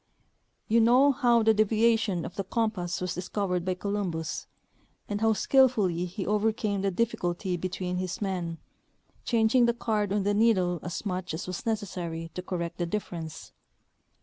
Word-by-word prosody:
You 230 +1 +4
know 250 +5 +6
how 240 -4 +3
the 220 0 +5
deviation 215 -3 +2
of - - -8
the 195 - -2
compass 195 -4 -1
was 180 -1 -2
dis 180 0 -6
covered 180 -4 -1
by 185 0 -1
Columbus, 180 -5 -3 0.6
and 205 0 -3
how 225 0 +4
skillfully 210 -7 +3
he 185 +2 -5
overcame 210 0 0
the 195 0 +1
diffi 230 +4 0
culty 175 0 -2
between 180 -1 -3
his 185 +3 -3
men, 180 -5 -3 0.7
changing 235 +1 +3
the 235 - +1
card 215 -4 -1
on 205 -1 +1
the 205 +1 +1
needle 190 -5 +3
as 175 +4 -5
much 180 -4 -3
as 165 - -5
was 185 +4 -6
necessary 175 -6 -3
to 180 - -4
correct 175 -2 -4
the 175 - 0
difference. 170 -5 -5
195 Hz, 165 wpm, -28 LUFS, 180-220 Hz, 0.7 s, know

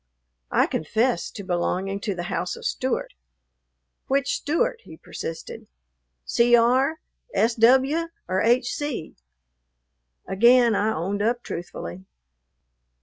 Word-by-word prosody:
I - - +3
confessed 225 - -1
to 200 - -6
belonging 185 +2 -1
to 200 -2 -3
the 175 - -4
house 175 - -3
of - - -11
Stewart. - - -2 0.9
"Which 275 +1 +1
Stewart?" 465 +11 -1
he - - -12
persisted, 165 0 -7 0.6
"C.R., 240 +6 +3 0.4
S.W., 260 +8 +3 0.2
or 185 +1 0
H.C.?" 245 - 0 1.1
Again 235 +4 +5
I 215 +1 +1
owned 195 +3 -2
up 240 +3 0
truthfully. 95 - -7
230 Hz, 100 wpm, -24 LUFS, 190-260 Hz, 1.1 s, Again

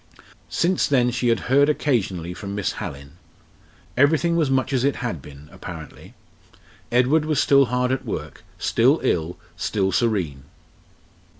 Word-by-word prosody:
Since 180 +2 +1
then 125 -3 +2
she 120 +1 -1
had 115 -1 +2
heard 140 +3 +3
occasionally 100 - -1
from 100 +2 -6
Miss 105 -2 -1
Hallin. 70 +3 -8 0.8
Everything 155 +5 +3
was 160 -5 +2
much 135 +1 0
as 130 -2 +1
it 140 0 +2
had 115 - -4
been, 70 +1 -13
apparently. 80 -3 -10 0.8
Edward 130 +6 +3
was 155 -2 0
still 140 -1 +5
hard 125 +1 0
at 130 - -1
work, - - -6
still - - +3
ill, 85 +1 0 0.2
still 95 -3 0
serene. 90 - -1
120 Hz, 140 wpm, -23 LUFS, 90-140 Hz, 0.8 s, still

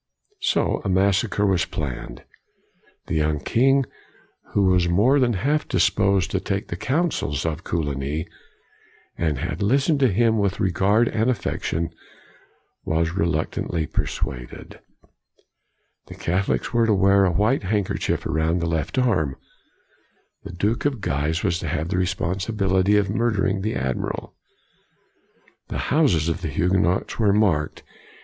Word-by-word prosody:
So 385 - 0
a 100 - -2
massacre 100 +2 +2
was 95 -5 +2
planned. 65 -3 -6 0.8
The - - -5
young 75 -1 +1
king, 135 - +2 0.7
who 100 - +3
was 90 -2 +3
more 115 +11 +4
than 125 -2 +2
half 145 +10 0
disposed 100 0 +2
to 95 - 0
take 100 +1 -3
the - - -3
counsels 130 - -1
of 80 0 -3
Coligny, 75 0 -2 0.9
and 80 -4 -1
had - - -4
listened 135 - +2
to 135 - +4
him 110 +2 +2
with 100 -1 0
regard 100 +4 +2
and 110 +2 0
affection, 85 -7 -2 0.9
was 80 +1 0
reluctantly 85 -2 -1
persuaded. - - -5 1.3
The - - -10
Catholics 95 +7 -1
were 115 -1 +3
to 105 - +3
wear 100 +1 +4
a 95 - +3
white 105 +10 +2
handkerchief 100 0 -1
around 80 +2 0
the 85 - -1
left 80 - -2
arm. 95 - +1 1.1
The - - -8
Duke 105 +6 -1
of 140 -5 0
Guise 75 +2 -1
was 90 -4 0
to - - -5
have 80 +3 -2
the 90 - 0
responsibility 95 +2 +1
of 100 -1 +2
murdering 105 -4 0
the 110 +3 -2
Admiral. 65 -2 -3 1.3
The - - -4 0.2
houses 130 - +3
of 85 - -2
the 85 - -3
Huguenots 90 +5 0
were 105 -3 +4
marked. 90 -8 +1
95 Hz, 135 wpm, -23 LUFS, 80-110 Hz, 1.3 s, more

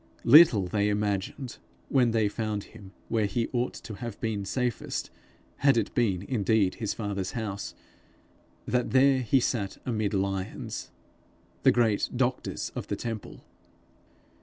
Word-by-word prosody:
Little 125 - +8
they 100 +3 +1
imagined, 105 +5 -2 0.3
when 125 -3 +3
they 110 -2 +2
found 105 -1 -3
him 100 -4 -13 0.2
where 110 -3 +1
he 115 +4 -1
ought 125 0 -1
to 110 - -8
have 120 -2 -6
been 105 -3 -2
safest 125 +2 -2 0.5
had 140 -3 +4
it 110 - 0
been 100 -7 +1
indeed 105 -4 +1
his 110 - -1
father's 100 -3 -3
house, 105 -4 -4 0.9
that 125 -1 0
there 135 0 +5
he 130 +2 +3
sat 105 -6 -1
amid 110 -4 -1
lions 95 -1 -3 0.7
the - - +6
great 115 -4 +2
doctors 125 +1 -1
of - - -5
the - - -2
temple! 115 -3 -6
110 Hz, 135 wpm, -28 LUFS, 100-120 Hz, 0.9 s, Little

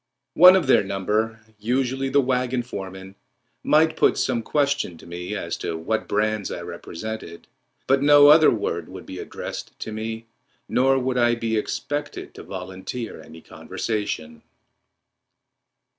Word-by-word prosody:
One 180 +5 +9
of 185 -4 +2
their 130 - +4
number, 105 +4 -1 0.2
usually 130 +4 -1
the 140 - +3
wagon 125 -1 0
foreman, 95 -4 -8 0.5
might 160 +1 +3
put - - +3
some 120 -3 0
question 140 - 0
to - - -15
me 90 +4 -6
as 100 - -3
to 80 - -4
what 110 +7 -2
brands 105 0 0
I - - -5
represented, 110 -3 -7 0.4
but 135 +1 +3
no 145 0 +7
other 155 +1 +8
word - - -2
would - - -10
be - - -8
addressed - - -7
to - - -5
me, 110 +1 -5 0.4
nor 135 +1 +3
would 130 -1 0
I 120 0 +3
be 115 -1 -2
expected 145 +7 -4
to - - -10
volunteer 95 +6 -7
any 80 +1 -13
conversation. 80 -10 -4
115 Hz, 145 wpm, -23 LUFS, 100-135 Hz, 0.5 s, One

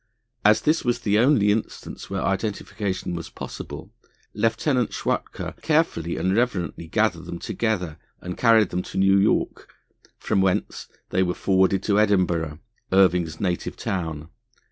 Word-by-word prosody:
As 105 +1 +5
this 155 +2 +2
was 120 -2 0
the 105 0 +2
only 115 -5 +4
instance 110 +1 -4
where 95 -1 -2
identification 100 -1 -2
was 85 -1 -5
possible, - - -8 0.4
Lieutenant 115 +3 0
Schwatka - - -3
carefully 150 - +1
and 95 +1 +1
reverently 95 -9 -1
gathered 95 -3 0
them 85 0 -6
together 90 -5 -2 0.2
and 90 0 -6
carried 115 -5 +4
them 90 - -2
to - - -8
New 95 +1 +4
York, 100 - 0 0.5
from 100 -3 0
whence 95 -1 -1 0.2
they 95 - +2
were 90 -1 0
forwarded 95 0 +2
to 105 -1 +2
Edinburgh, 90 -7 +1 0.3
Irving's 90 -4 +3
native 90 -3 -2
town. 80 -4 -4
95 Hz, 140 wpm, -24 LUFS, 90-110 Hz, 0.5 s, As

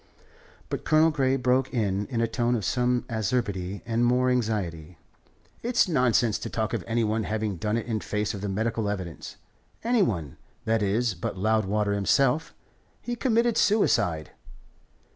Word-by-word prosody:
But - - -4
Colonel 155 +1 +4
Grey 135 -3 +1
broke 130 0 +1
in 105 -4 -1
in 120 -3 -2
a 115 - +2
tone 120 +1 0
of 110 -5 -2
some 125 +1 +1
acerbity 100 -4 -2
and 115 0 0
more 125 +1 +3
anxiety: 90 -9 -2 0.6
"It's 235 -2 +2
nonsense 125 - +2
to - - -5
talk 110 -1 -2
of - - -2
any 115 0 +1
one 110 0 0
having 110 -3 -2
done 105 +4 -1
it 115 - -3
in 110 -2 -2
face 105 +1 -2
of 100 - -6
the 100 - -3
medical 110 +1 -1
evidence 90 -7 -5 0.5
any 235 -1 +2
one, 85 - -1 0.3
that 110 0 +1
is, 105 +3 +1
but 90 +1 -5
Loudwater 105 0 +1
himself. 135 +9 +2 0.5
He 240 - -4
committed 235 -1 +1
suicide." 90 - +2
115 Hz, 160 wpm, -26 LUFS, 100-125 Hz, 0.6 s, Colonel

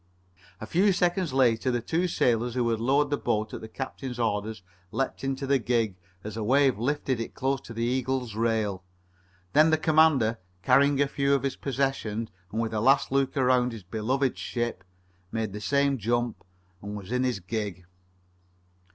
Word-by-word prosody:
A - - -6
few 190 - +3
seconds 175 -1 +1
later 130 -2 +2
the 120 -1 +1
two 165 +9 0
sailors 120 -6 +1
who 125 -2 +1
had 115 -1 0
lowered 140 +5 +2
the 145 - +2
boat 110 0 -1
at - - -6
the 110 - -7
captain's 130 +1 -6
orders 110 -3 -2 0.3
leaped 135 - -2
into 135 0 -2
the 135 0 +2
gig 115 -5 0 0.3
as 105 0 -6
a 110 - -3
wave 130 0 +3
lifted 130 0 -1
it 115 - -5
close 135 0 -1
to - - -12
the 115 0 -3
Eagle's 125 -1 -1
rail. 110 -4 0 0.7
Then 155 +2 +6
the 160 - +4
commander, 155 -8 +3 0.2
carrying 140 +6 +4
a 140 - +3
few 140 0 +1
of 135 - -1
his 135 - -1
possessions 130 -5 -2 0.2
and 110 - -2
with 115 -1 -1
a 105 - 0
last 135 +3 +4
look 135 +1 +1
around 125 -2 +3
his 110 -4 -8
beloved 120 +8 -1
ship, 120 -5 -3 0.5
made 110 -3 -2
the 105 - -6
same 140 +1 +1
jump 120 +2 -1 0.4
and 105 +1 -6
was 100 0 -9
in 125 +1 +1
his 125 -6 0
gig. 95 -2 -4
125 Hz, 180 wpm, -27 LUFS, 110-140 Hz, 0.7 s, Then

